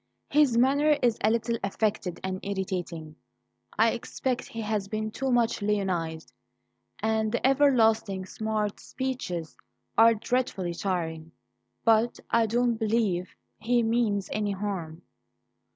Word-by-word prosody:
His 285 -5 +4
manner 285 +4 +4
is 235 -3 +2
a 215 - +5
little 230 0 0
affected 200 -2 -1
and 185 0 -3
irritating 180 -5 -4 0.6
I - - +5
expect 255 -1 -3
he 230 - -6
has 210 -2 -2
been 215 +1 -3
too 265 +4 -2
much 235 -2 +2
lionized 185 -6 -1 0.6
and 220 0 0
the 240 - -1
everlasting 225 -8 +3
smart 215 +1 -2
speeches 215 - -4 0.4
are 230 0 +7
dreadfully 210 -6 -1
tiring; 165 -4 -3 0.5
but 225 +1 +3
I 230 -1 +3
don't 240 +1 +1
believe 215 -5 0 0.2
he 240 +2 +2
means 225 -4 +1
any 210 -1 -1
harm." 185 -5 -5
215 Hz, 120 wpm, -27 LUFS, 190-235 Hz, 0.6 s, are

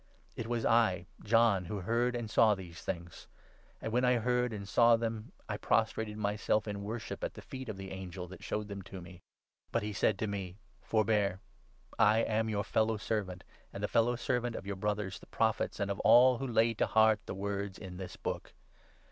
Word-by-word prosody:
It 115 - -4
was 120 -1 -1
I, 110 -5 +3 0.2
John, 110 -4 +4
who 100 +3 -4
heard 120 +5 +1
and 120 -2 -3
saw 110 0 +4
these 90 -3 -10
things; 85 0 -6 0.5
and, 110 - -4
when 125 +1 +2
8 125 0 +4
I - - +1
heard 125 +1 +1
and 100 -2 -6
saw 115 +3 +5
them, 115 -1 -3 0.2
I - - -3
prostrated 110 -1 0
myself 105 +1 0
in 100 -1 -4
worship 110 +2 -5
at - - -3
the - - -9
feet 130 -2 -7
of 105 - -5
the 95 -1 -7
angel 95 -1 -6
that 95 - -11
showed 105 0 -3
them 100 -1 -6
to 95 0 -9
me. 90 0 -12 0.5
But 115 - 0
he 105 0 -3
said 100 +1 +2
to 110 - -1
9 105 - -3
me 95 -2 -5
— - - -33
' - - -34
Forbear; 105 -3 +2 0.6
I 110 +2 +5
am 110 0 0
your 105 -1 0
fellow 110 +1 +1
servant, 100 -4 -3 0.3
and 100 - -7
the - - +2
fellow 115 +3 +2
servant 120 0 -1
of - - -6
your 100 0 -3
Brothers, 105 -1 -2
the - - -16
Prophets, 110 -1 0
and 100 -1 0
of 100 - -3
all 125 0 +6
who 135 - -2
lay 115 -1 +3
to - - 0
heart 110 -1 +4
the - - -4
words 100 0 -3
in 90 -3 -8
this 95 -1 -7
book. - - -5
105 Hz, 215 wpm, -32 LUFS, 100-115 Hz, 0.6 s, all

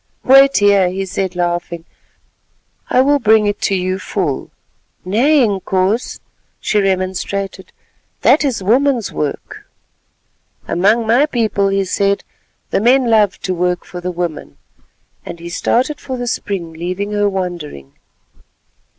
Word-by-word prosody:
"Wait 270 +1 +6
here," 200 -2 +4
he 190 +1 -3
said 190 0 -3
laughing; 175 -1 -2 1.0
"I 255 - +4
will 285 +2 +3
bring 220 -2 +4
it 205 0 -2
to 195 - +1
you 185 0 -2
full." 180 -8 -3 0.6
"Nay, 260 +9 +3
Inkoos," 195 +2 -1 0.4
she 210 - 0
remonstrated, 190 0 -2 0.5
"that 305 - +4
is 265 -7 -1
a - - -8
woman's 250 +1 +2
work." 150 -2 -5 1.0
"Among 210 +6 +2
my 245 +7 +3
people," 220 -7 0
he 195 0 0
said, 200 +2 0 0.5
"the - - +1
men 245 +1 +3
love 210 -3 +3
to 185 - -1
work 180 0 -1
for 180 - -8
the 180 - -3
women," 170 - -5 0.7
and 170 - -8
he 170 +1 -8
started 255 - 0
for 260 -2 -5
the 245 - -4
spring, 195 -8 -4
leaving 180 +5 -4
her 205 -1 +1
wondering. 175 - -5
195 Hz, 135 wpm, -17 LUFS, 180-230 Hz, 1.0 s, Wait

